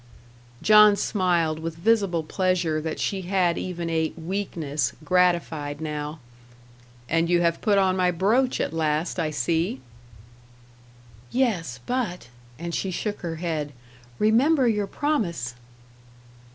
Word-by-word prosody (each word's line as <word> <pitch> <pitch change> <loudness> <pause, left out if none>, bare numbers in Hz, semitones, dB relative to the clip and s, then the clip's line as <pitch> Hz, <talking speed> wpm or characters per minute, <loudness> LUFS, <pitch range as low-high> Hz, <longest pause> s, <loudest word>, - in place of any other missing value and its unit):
John 210 -1 +7
smiled, 175 -6 0
with 165 0 -5
visible 190 -2 +1
pleasure 175 -2 0
that 160 0 -4
she 195 -1 -1
had 180 -2 +1
even 175 -2 -4
a 160 -1 0
"weakness" 160 - -2
gratified 165 -4 +1
now. 150 0 -4 0.9
"And 165 +3 +1
you 175 0 +3
have 170 -1 +1
put 205 -2 +3
on 190 -1 +3
my 180 -1 +2
brooch 220 +9 +1
at - - -1
last, 160 +2 -1
I 160 -2 0
see." 155 +1 -1 1.5
"Yes; 170 - -1
but 220 - -3
" 120 0 -25
and 170 +2 -5
she 190 - -1
shook 205 +3 -3
her 170 -3 -4
head 155 -3 -3 0.4
"remember 255 +6 +3
your 210 -3 +1
promise!" 175 - -1
175 Hz, 125 wpm, -25 LUFS, 160-200 Hz, 1.5 s, John